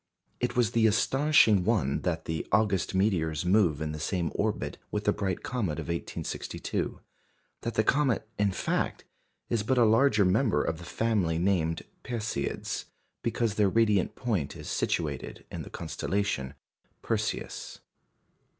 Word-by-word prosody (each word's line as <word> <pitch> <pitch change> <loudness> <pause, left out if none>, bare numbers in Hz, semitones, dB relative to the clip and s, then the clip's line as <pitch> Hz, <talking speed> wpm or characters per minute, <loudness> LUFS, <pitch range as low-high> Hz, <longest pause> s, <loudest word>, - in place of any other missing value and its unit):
It 125 0 -1
was 120 -3 +3
the 115 -1 +4
astonishing 115 -2 +4
one 95 - +1
that 85 -3 -2
the 80 -1 -3
August 100 -4 +2
meteors 90 -5 +1
move 90 -6 +3
in 75 - -2
the 75 - -5
same 85 +1 -1
orbit - - -2
with - - -2
the - - +3
bright 95 -3 -2
comet 115 -11 -1
of - - -5
1862 85 0 -3 0.6
that 115 - -3
the 110 - +3
comet, 130 -2 +2
in 100 -1 +3
fact, - - -1 0.4
is 115 - 0
but 125 +5 +1
a 120 - +6
larger 110 -2 +4
member 95 - +3
of 80 0 -2
the 85 - -9
family 100 -7 0
named 85 -3 +1 0.2
"Perseids" 110 - -3 0.4
because 115 -2 0
their 105 -2 +3
radiant 105 -3 +2
point 105 - -1
is - - -9
situated 75 -6 -2
in - - -5
the - - -8
constellation 95 -10 -2 0.5
Perseus. - - -3
100 Hz, 145 wpm, -29 LUFS, 85-115 Hz, 0.6 s, a